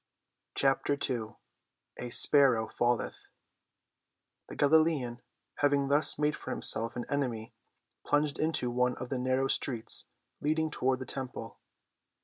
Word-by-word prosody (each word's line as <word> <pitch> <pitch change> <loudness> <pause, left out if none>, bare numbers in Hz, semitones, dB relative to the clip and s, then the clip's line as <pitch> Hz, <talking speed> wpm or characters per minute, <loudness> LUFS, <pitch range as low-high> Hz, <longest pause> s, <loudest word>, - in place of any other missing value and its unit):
CHAPTER 140 +1 +1
II 115 -3 -3 0.6
A 125 - -5
SPARROW 125 -3 +5
FALLETH 120 -1 -1 1.2
The - - -8
Galilean, 145 -5 +2 0.4
having 140 -1 +2
thus 145 +2 +2
made 150 +1 +1
for - - -9
himself 115 +1 +1
an 120 - -4
enemy, 125 -6 -3 0.5
plunged 145 -1 0
into 155 -6 0
one 125 0 +1
of 125 0 -7
the 130 - -2
narrow 130 +1 +1
streets 120 -4 -1 0.4
leading 155 +1 0
toward 130 -2 0
the 130 - -7
temple. 125 -5 -7
130 Hz, 125 wpm, -30 LUFS, 120-145 Hz, 1.2 s, SPARROW